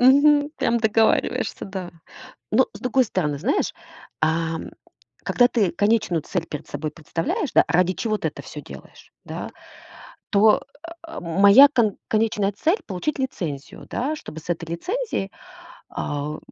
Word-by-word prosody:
Мгм. 285 +3 +5
Прям 235 0 +1
договариваешься, 220 0 +1
да. 190 -2 -6 0.6
Но, - - +4
с - - -10
другой 255 +1 +2
стороны, 150 -9 -1
знаешь. 230 - 0 0.5
А, 165 +1 +1
м, - - -7 0.5
когда 245 -1 +4
ты 210 -8 +1
конечную 205 -4 +1
цель 170 -3 -3
перед 150 - -7
собой 150 +2 -4
представляешь, 165 - -3
да, - - +6
ради 180 +2 +2
чего 215 +4 -1
ты - - -1
это - - -10
всё - - -9
делаешь, - - -13
да, - - -6 0.8
то, 210 +1 +5 0.4
а, 330 - -10
м 170 +2 -3
моя 235 +8 +9
кон 235 -8 +1
конечная 215 -2 +1
цель- 330 - +1
получить 205 +10 -3
лицензию, 165 - -5
да, 275 +6 -1
чтобы 160 - -9
с 165 - -17
этой 165 -1 -2
лицензией, 360 - -3 0.6
а, 145 0 -3
у 155 - -7
205 Hz, 155 wpm, -23 LUFS, 165-250 Hz, 0.8 s, моя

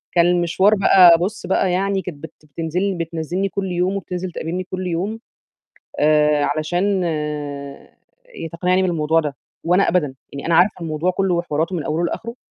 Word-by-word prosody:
كان 170 - +5
المشوار 175 +3 +3
بقى، 185 -4 +7
بُص 205 +5 -3
بقى 190 -1 +1
يعني 195 +1 0
كانت 175 -6 -7
بت 160 - -8
بتنزل 165 +4 -3
لي 200 -2 0
بتنزلني 170 +4 -3
كل 190 -1 -3
يوم 180 +2 0
وبتِنزِل 180 -1 -4
تقابلني 175 +4 -4
كل 185 0 -5
يوم 195 +6 -2 0.8
آآ، 150 -1 +3
علشان 180 +5 0 1.5
تقنعني 180 +2 +1
بالموضوع 165 -3 +1
ده، 145 -3 -3 0.3
وأنا 180 +4 +3
أبدًا 150 -7 0 0.2
يعني 140 - -6
أنا 165 -1 +2
عارفة 185 0 +3
الموضوع 160 +2 -1
كله 185 0 0
وحواراته 165 +1 -1
من 160 - -3
أوله 165 +3 -1
لآخره. 235 +7 -5
175 Hz, 160 wpm, -20 LUFS, 160-190 Hz, 1.5 s, بقى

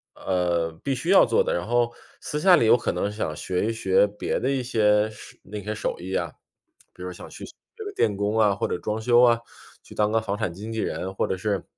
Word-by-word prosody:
呃， 85 -3 0
必 140 - 0
须 150 +8 -4
要 195 - +7
做 480 - +2
的， - - -1
然 - - -2
后 120 -1 +1 0.3
私 150 - -3
下 180 +3 +6
里 135 - +3
有 110 - +7
可 - - -1
能 100 - -1
想 105 -7 -3
学 90 +5 -2
一 - - 0
学 95 -3 +3
别 105 0 -3
的 125 - -1
一 135 -1 0
些 105 -3 +2
手 105 - -13
那 105 +1 -7
些 105 +2 -4
手 - - -3
艺 95 +2 -4
啊， 85 -2 -2 0.6
比 - - -15
如 90 - -5
想 - - -11
去 - - -9
学 - - -13 0.3
个 410 - -6
电 105 - +1
工 105 +2 -1
啊， 105 -2 +4
或 110 - -1
者 - - -2
装 105 +1 -3
修 120 +1 +5
啊、 120 -2 +5 0.4
去 - - -14
当 105 0 +1
个 115 - +3
房 105 -2 -3
产 100 -6 -2
经 105 +5 -8
纪 110 - -3
人。 95 -3 -3
或 - - 0
者 95 - -2
是， 100 0 -2
105 Hz, 270 characters per minute, -25 LUFS, 95-120 Hz, 0.6 s, 要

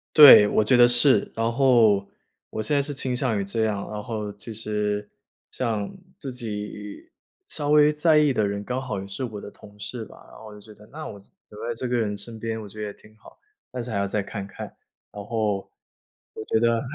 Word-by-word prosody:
对， 145 -8 +11
我 110 - +2
觉 115 +5 +3
得 120 0 +7
是。 120 +3 +3
然 115 0 0
后 115 -6 +4 0.4
我 110 - -4
现 110 +7 0
在 140 - +3
是 145 +1 -4
倾 130 -2 -2
向 125 -5 0
于 100 - -2
这 110 +3 -1
样， 105 -2 -2
然 105 -1 -5
后 105 -3 -4
其 105 +3 -9
实 105 -1 -2 0.4
像 110 -5 -2 0.3
自 135 -5 -7
己 105 -3 -7 0.4
稍 145 -1 -3
微 150 0 +5
在 155 +1 +4
意 150 -2 +4
的 110 -3 +1
人 100 0 -2
刚 125 +4 -3
好 125 -7 -4
也 95 - -7
是 100 +6 -5
我 110 -4 -5
的 100 - -9
同 105 0 -17
事 115 +2 -5
吧， - - -16
然 - - -14
后 110 - -12
我 105 - -11
就 105 - -12
觉 105 +1 -14
得， 105 - -16
那 155 +2 -7
我 100 - -8 0.3
留 105 +1 -8
在 120 - -1
这 125 +3 -4
个 125 0 0
人 105 -3 -1
身 115 +1 -9
边， 110 0 -4
我 105 - -9
觉 105 +2 -9
得 105 - -3
也 100 - -7
挺 110 +1 -20
好 110 - -16
的， - - -26 0.3
但 125 - -4
是 120 - -7
还 110 - -2
要 100 - +1
再 105 +1 -1
看 100 0 -6
看。 100 - -8 0.5
然 105 - -7
后 105 -2 -1 0.7
我 - - -7
觉 110 - +1
得， 115 0 +2
110 Hz, 255 characters per minute, -24 LUFS, 105-125 Hz, 0.7 s, 对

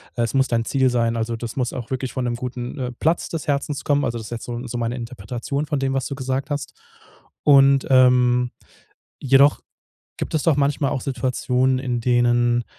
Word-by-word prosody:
Es 115 -2 -1
muss 135 0 +3
dein 115 -1 0
Ziel 130 0 +2
sein, 115 -1 +1
also 115 +1 -2
das 115 0 -6
muss 125 -2 -1
auch 120 -2 -6
wirklich 130 -1 -3
von 130 - -2
'nem 120 -1 -1
guten, 125 +2 -6
äh, 125 -1 -3
Platz 160 +7 -1
des 165 -2 -5
Herzens 145 0 -1
kommen. 145 0 +1
Also, 120 - -2
das 110 - -8
ist - - -13
jetzt 115 - -5
so 120 - -5
'n 120 +2 -5
so 120 +1 -4
meine 120 0 -2
Interpretation 120 +4 -4
von 145 -1 -2
dem, 135 0 -1
was 135 -1 -1
du - - -5
gesagt 130 0 -3
hast. 145 -1 -3 0.7
Und, 140 -2 +5
ähm, 125 -1 +4 0.7
jedoch 135 +2 +4 0.6
gibt - - -4
es 155 - +1
doch 160 -4 +3
manchmal 140 0 +1
auch - - -2
Situationen, 130 0 0
in 125 -2 -2
denen, 120 0 +2
125 Hz, 205 wpm, -22 LUFS, 120-135 Hz, 0.7 s, Und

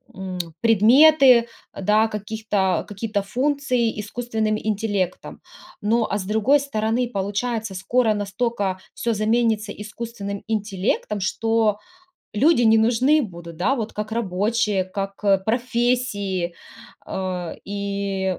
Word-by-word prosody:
м, 190 -1 -6 0.2
предметы, 245 +3 +6 0.3
да, 215 +3 +3
каких-то 210 -3 -1
какие-то 205 0 -2
функции 250 0 0
искусственным 220 0 -2
интеллектом. 205 -4 -2 0.4
Но, 225 +2 +1
а, 205 - 0
с - - -4
другой 220 +8 +3
стороны, 235 -2 -1
получается, 205 +1 -2
скоро 220 +4 +1
настолько 205 -1 -2
всё 235 - -1
заменится 220 0 +1
искусственным 210 -1 -6
интеллектом, 210 -1 -1
что 220 +2 +1 0.6
люди 280 +3 +4
не 225 -1 +5
нужны 250 +7 +3
будут, 170 -5 -8
да, 210 +11 +1
вот, 225 -3 -4
как 210 +1 -5
рабочие, 210 -1 0
как 195 +2 -6 0.2
профессии, 235 -6 0 0.5
а, 185 -3 -4
и 200 -2 -2
215 Hz, 110 wpm, -22 LUFS, 200-235 Hz, 0.6 s, предметы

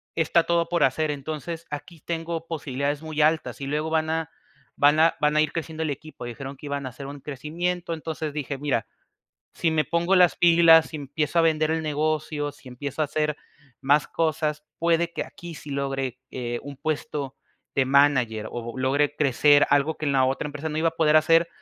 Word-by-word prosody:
está 165 +1 +2
todo 170 -1 +1
por 170 -3 +2
hacer, 150 +3 0
entonces 155 +3 -5
aquí 155 +3 -7
tengo 165 0 -4
posibilidades 145 -2 -2
muy 155 -1 -2
altas, 155 0 +1
y - - -3
luego 150 +2 -1
van 160 0 0
a 160 0 -2 0.5
van 145 +2 +4
a 165 +1 +5
van 150 0 +2
a - - +6
ir 155 -1 +1
creciendo 160 -1 -4
el 155 - -1
equipo, 145 -2 -8
dijeron 135 +3 -7
que 145 - -9
iban 140 -1 -3
a - - -4
hacer 135 +2 -10
un 145 0 -8
crecimiento, 170 +5 -3
entonces, 155 -2 -4
dije: 140 -2 -4
"Mira, 135 -7 -1 0.7
si 165 - +1
me 155 -2 +2
pongo 170 +6 +1
las 180 -2 +5
pilas 165 -2 +6
y - - -1
empiezo 150 +3 -2
a - - +3
vender 155 -1 +2
el 160 0 -1
negocio, 150 -1 -1
si 135 -2 -15
empiezo 140 +4 -4
a 150 - +1
hacer 150 +1 -1 0.4
más 145 +2 +3
cosas, 155 -2 -1
puede 170 0 +1
que - - -3
aquí 170 -1 -10
sí 150 -1 -10
logre, 135 -2 -3
eh, 120 -1 -4
un 145 -1 -8
puesto 145 -2 -3 0.4
de 135 - +3
manager, 130 -6 +3
o 120 +1 -6
logre 140 +3 +1
crecer", 145 +1 +4
algo 145 +2 +2
que 155 - -4
en 140 - +1
la 130 -1 +4
otra 135 +3 -1
empresa 150 +2 -5
no 155 - -2
iba 165 +1 +3
a 165 - -24
poder 155 -1 +4
hacer, 165 +2 +4
150 Hz, 205 wpm, -25 LUFS, 140-160 Hz, 0.7 s, a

